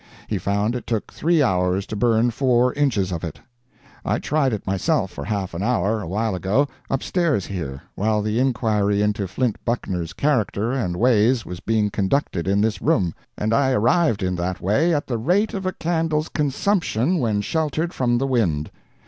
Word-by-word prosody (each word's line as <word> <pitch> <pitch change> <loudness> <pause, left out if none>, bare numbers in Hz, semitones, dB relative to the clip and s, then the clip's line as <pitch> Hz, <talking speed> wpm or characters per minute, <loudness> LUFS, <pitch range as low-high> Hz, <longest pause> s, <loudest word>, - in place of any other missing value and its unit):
He - - -2
found 100 +4 0
it 125 - -6
took 115 -3 -2
three 165 -1 +2
hours 90 -3 +1
to 110 - -6
burn 115 +2 +2
four 125 0 +2
inches 115 -10 +1
of 85 -1 -4
it. 80 -3 -5 0.6
I - - 0
tried 150 -3 +1
it 110 - -4
myself 95 -1 0
for 70 - -7
half 100 -3 -3
an 85 - -4
hour, 110 -1 +1
awhile 105 +4 -1
ago, 100 +10 +1 0.2
up 135 0 -1
stairs 165 - +1
here, 80 -9 -5
while 105 +1 0
the 110 +2 0
inquiry 105 -5 +1
into 105 -2 0
Flint 115 +4 -2
Buckner's 90 -9 -2
character 115 - 0
and 105 -10 -1
ways 115 +1 +3
was 90 -1 -7
being 110 -1 0
conducted 95 - 0
in 100 +1 +2
this 105 -2 0
room, 100 - +2 0.2
and 110 +2 0
I 135 +1 +3
arrived 120 - +2
in 90 0 0
that 90 +1 -2
way 140 - +2
at 150 -2 0
the 120 -3 -2
rate 185 - +1
of 195 -2 -3
a - - +1
candle's 160 -2 -1
consumption 160 - 0
when 110 -5 +1
sheltered 160 - -1
from 120 -2 +1
the 135 - 0
wind. 95 - 0
110 Hz, 180 wpm, -22 LUFS, 100-135 Hz, 0.6 s, ways